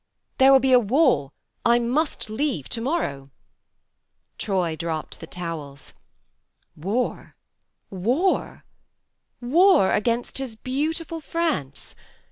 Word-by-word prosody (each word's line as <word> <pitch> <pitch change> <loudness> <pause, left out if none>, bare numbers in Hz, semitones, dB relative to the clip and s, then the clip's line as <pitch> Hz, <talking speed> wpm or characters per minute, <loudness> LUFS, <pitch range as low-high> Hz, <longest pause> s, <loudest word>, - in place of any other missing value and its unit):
"There 265 +1 +7
will 270 - +7
be 260 0 +4
war 245 - +3 0.3
I 235 0 +4
must 255 +6 -1
leave 220 - -2
to 230 - -3
morrow." 185 - -2 1.1
Troy 180 -5 -1
dropped 160 -1 -5
the 165 - -9
towels. 160 -6 -7 0.8
10 - - -19
THE 175 - -7
MARNE 205 - 0
11 - - -1
War! - - -16 1.3
War! - - -39 0.8
War 310 - +4
against 235 +4 -1
his 260 -5 -5
beautiful 315 +7 -3
France! 310 - -3
235 Hz, 115 wpm, -24 LUFS, 170-280 Hz, 1.3 s, There